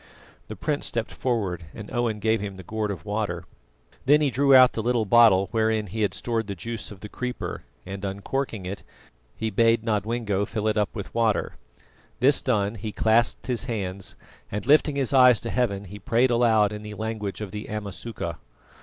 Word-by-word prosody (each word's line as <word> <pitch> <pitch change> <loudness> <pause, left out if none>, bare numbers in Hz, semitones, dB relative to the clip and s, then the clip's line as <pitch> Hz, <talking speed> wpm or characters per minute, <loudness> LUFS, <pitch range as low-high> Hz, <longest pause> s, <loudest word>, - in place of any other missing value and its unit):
The - - -7
prince 150 -1 -2
stepped 115 -1 -3
forward 100 -9 -2
and 105 -2 -9
Owen 120 -3 0
gave 110 +1 +1
him 100 -2 -5
the 95 - -10
gourd 110 +3 -3
of 90 -5 -6
water. 100 -4 -2 0.6
Then 145 +2 +6
he 145 -3 +1
drew 140 +2 +4
out 130 -1 +8
the 110 - -3
little 120 -1 +1
bottle 105 -4 +6
wherein 110 -1 +1
he 105 +3 -5
had 105 - +1
stored 115 -3 -2
the 100 - -4
juice 115 +5 -5
of 100 -2 -12
the 105 - -7
creeper, 125 +3 -5 0.2
and 95 +1 -7
uncorking 100 +2 -3
it, 95 +2 -5 0.5
he 110 0 -3
bade 115 +2 +3
Nodwengo 110 -2 0
fill 110 0 -2
it 110 - +1
up 105 -2 +1
with 100 -3 -6
water. 115 -2 +1 0.7
This 140 +3 +4
done, 105 -5 +1
he 110 0 -5
clasped 110 +3 +2
his 120 -5 -2
hands, 100 -4 -4 0.4
and 105 0 -3
lifting 150 +1 +4
his 140 -1 0
eyes 125 -3 +7
to 115 - -4
heaven, 100 -6 0
he 100 +2 -10
prayed 120 +5 +2
aloud 110 -3 +3
in 105 - -6
the 105 0 -8
language 110 -2 -4
of 105 -3 -6
the 105 +1 -6
Amasuka. 100 - -5
110 Hz, 190 wpm, -25 LUFS, 100-120 Hz, 0.7 s, out